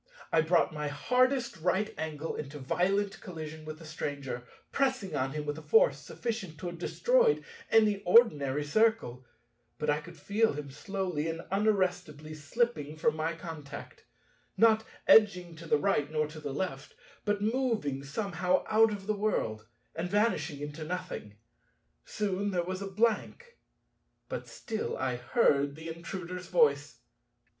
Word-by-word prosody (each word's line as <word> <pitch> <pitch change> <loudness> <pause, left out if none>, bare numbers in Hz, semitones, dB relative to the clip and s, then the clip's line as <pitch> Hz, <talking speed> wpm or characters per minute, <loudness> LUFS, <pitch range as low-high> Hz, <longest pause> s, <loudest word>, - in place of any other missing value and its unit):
I 165 - +5
brought 165 0 +2
my 150 -1 -3
hardest 250 - +1
right 185 +6 0
angle 160 0 -4
into 150 0 -6
violent 195 +8 0
collision 160 -4 -7
with 155 0 -6
the 165 - -12
Stranger, 140 -5 -5 0.2
pressing 260 -8 0
on 135 0 -1
him 150 -1 -3
with 145 +1 -3
a - - -10
force - - +4
sufficient 220 -9 -5
to 165 - -8
have 175 -1 -5
destroyed 480 - +3 0.3
any 210 -3 +4
ordinary 150 - +4
Circle: 150 - +1 0.5
but 150 -1 +1
I 150 +1 0
could 170 +2 -12
feel 220 0 +1
him 145 -1 -6
slowly 180 -2 -3
and 165 0 -3
unarrestably 185 -7 0
slipping 155 -1 -1
from 155 -1 +2
my 160 +1 -1
contact; 155 -4 -9 0.5
not 220 -1 +5 0.2
edging 180 -6 +5
to 165 +1 -10
the 150 - +4
right 150 -3 +1
nor 155 -1 +1
to 155 +1 -9
the 145 -2 -5
left, 140 -3 -4 0.3
but 205 -1 0
moving 220 - 0
somehow 180 +4 0
out 220 0 +5
of 200 -2 -5
the 215 - +1
world, 115 - -1 0.3
and 170 +2 -3
vanishing 175 -8 +1
into 150 +2 -5
nothing. 175 - -5 0.7
Soon 200 -1 -1
there 180 -3 0
was 185 +1 -4
a 200 - -4
blank. 235 - 0 0.7
But - - -5
still 220 -2 -4
I 130 -2 -1
heard 140 - +2
the 160 +1 -8
Intruder's 180 +2 -6
voice. 470 -2 +2
175 Hz, 150 wpm, -30 LUFS, 150-210 Hz, 0.7 s, I